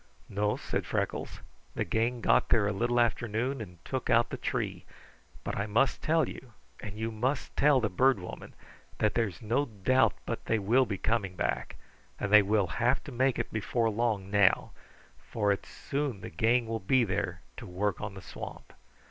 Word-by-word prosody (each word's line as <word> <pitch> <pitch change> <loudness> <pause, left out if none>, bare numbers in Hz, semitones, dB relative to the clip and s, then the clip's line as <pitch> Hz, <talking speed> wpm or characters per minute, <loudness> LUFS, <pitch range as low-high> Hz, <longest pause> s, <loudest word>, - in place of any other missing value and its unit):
"No," 105 +1 0
said - - -3
Freckles. - - -3 0.3
"The - - 0
gang 115 +2 0
got - - +3
there 110 -3 +4
a 105 - 0
little 120 +4 +1
after 120 0 +1
noon 120 +5 -2
and 90 -5 -9
took 130 -2 -3
out 115 +1 +4
the - - -2
tree, - - -3 0.6
but - - -3
I 100 +1 -2
must 120 +6 +2
tell 160 0 +2
you, 125 -4 -10 0.3
and 105 0 -7
you 110 +1 -2
must 130 +6 -2
tell 145 -2 +5
the 115 - +1
Bird 130 +7 +3
Woman, 90 - -9 0.4
that 105 -1 +1
there's 115 -2 -1
no 120 +7 +1
doubt 115 0 +2
but - - -4
they 115 - +2
will 120 +6 +3
be 100 - -2
coming 100 -3 -1
back, - - -2 0.4
and 100 - -2
they 105 - +10
will 100 0 +2
have 120 +8 0
to 145 - -9
make 130 0 +1
it - - -3
before 115 +2 0
long 105 -3 -1
now, 100 -2 +3 0.5
for 105 -3 -1
it's 100 - -3
soon 140 -7 -3
the - - -7
gang 115 +7 +2
will 115 0 -3
be 125 +6 +3
there 95 -5 -2
to - - -8
work 95 +2 -2
on 105 -1 -5
the 95 - -9
swamp." - - -9
110 Hz, 190 wpm, -30 LUFS, 100-125 Hz, 0.6 s, they